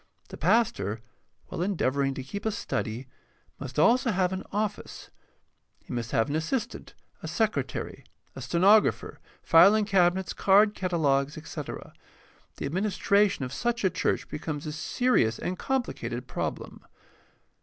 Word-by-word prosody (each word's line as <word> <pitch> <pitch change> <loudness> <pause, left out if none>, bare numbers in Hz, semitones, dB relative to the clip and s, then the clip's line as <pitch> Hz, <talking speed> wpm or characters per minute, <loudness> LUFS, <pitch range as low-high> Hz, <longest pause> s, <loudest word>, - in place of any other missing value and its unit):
The - - -8
pastor, 155 - +1 0.5
while - - -6
endeavoring 140 -8 0
to 130 - -5
keep 200 +10 -7
a - - +3
study, 125 - -3 0.5
must 135 -1 -7
have 155 - +5
also 245 +1 +3
an 190 -1 0
office. 210 0 -4 0.7
He - - -7
must 120 -2 -3
have 110 0 +1
an 145 - -2
assistant, 185 +10 -3 0.3
a - - -6
secretary, - - -2 0.3
a - - -7
stenographer, 200 +5 +3 0.2
filing 200 +6 +6
cabinets, 185 -2 +2
card 205 +2 +4
catalogues, 150 -7 0
etc. 155 -2 -7 0.6
The - - -4
administration 200 0 +1
of 125 - -7
such 240 - -1
a 190 - +3
church 180 - -1
becomes 150 0 -5
a 155 - -4
serious 155 - +1
and 180 0 -4
complicated 125 - -3
problem. - - -5
175 Hz, 135 wpm, -27 LUFS, 140-205 Hz, 0.7 s, filing